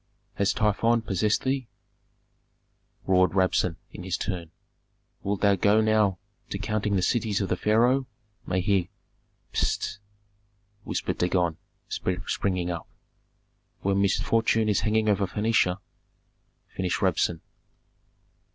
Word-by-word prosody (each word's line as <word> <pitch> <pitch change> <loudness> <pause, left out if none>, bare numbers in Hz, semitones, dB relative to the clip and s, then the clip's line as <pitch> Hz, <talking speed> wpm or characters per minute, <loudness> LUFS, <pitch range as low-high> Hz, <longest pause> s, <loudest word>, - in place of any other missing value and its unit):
"Has 100 0 +1
Typhon 115 +2 +2
possessed 105 0 0
thee?" 130 -2 -1 1.4
roared 95 0 +3
Rabsun, 90 -2 +2 0.2
in - - -9
his 90 0 -2
turn. 90 -5 -4 0.7
"Wilt 100 0 -2
thou 100 -1 +5
go 100 +3 +3
now 110 -3 +3 0.3
to - - -3
counting 105 0 -1
the 95 - +1
cities 110 -3 +1
of 100 - -2
the - - +1
pharaoh, 120 +5 +2 0.4
may 90 0 0
he 95 -2 +1 0.3
" - - -42
"Pst!" 105 - -1 0.9
whispered - - -2
Dagon, 90 -2 +1 0.3
springing 90 0 -2
up. 85 -2 -5 0.9
"When 100 0 +1
misfortune 110 +2 +2
is 105 - +2
hanging 110 0 +1
over 100 -2 +2
Phœnicia 105 -2 +1 0.5
" - - -37
finished 90 0 -1
Rabsun. 85 -2 +1
100 Hz, 120 wpm, -26 LUFS, 90-110 Hz, 1.4 s, thou